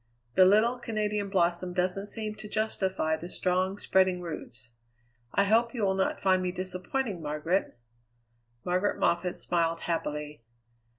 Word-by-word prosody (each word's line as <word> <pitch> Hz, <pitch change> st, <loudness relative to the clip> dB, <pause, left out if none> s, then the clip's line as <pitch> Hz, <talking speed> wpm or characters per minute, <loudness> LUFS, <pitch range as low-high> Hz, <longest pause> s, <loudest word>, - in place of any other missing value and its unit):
The 185 Hz, -, +7 dB
little 220 Hz, +6 st, +4 dB
Canadian 210 Hz, -3 st, -2 dB
blossom 180 Hz, -1 st, +1 dB
doesn't 185 Hz, +2 st, 0 dB
seem 215 Hz, 0 st, -3 dB
to 215 Hz, 0 st, -9 dB
justify 190 Hz, -7 st, 0 dB
the 170 Hz, +2 st, -8 dB
strong, 185 Hz, +2 st, 0 dB
spreading 190 Hz, -2 st, +2 dB
roots. 120 Hz, -9 st, -7 dB, 0.6 s
I 200 Hz, -, +3 dB
hope 230 Hz, +4 st, +2 dB
you 225 Hz, -, -1 dB
will 190 Hz, -1 st, +3 dB
not 190 Hz, 0 st, 0 dB
find 185 Hz, -1 st, +3 dB
me 180 Hz, -1 st, -1 dB
disappointing, 185 Hz, +3 st, -3 dB
Margaret." 150 Hz, +1 st, -1 dB, 0.9 s
Margaret 185 Hz, +3 st, +1 dB
Moffatt 175 Hz, +1 st, +1 dB
smiled 165 Hz, -1 st, 0 dB
happily. 150 Hz, -4 st, -3 dB
185 Hz, 135 wpm, -29 LUFS, 175-205 Hz, 0.9 s, The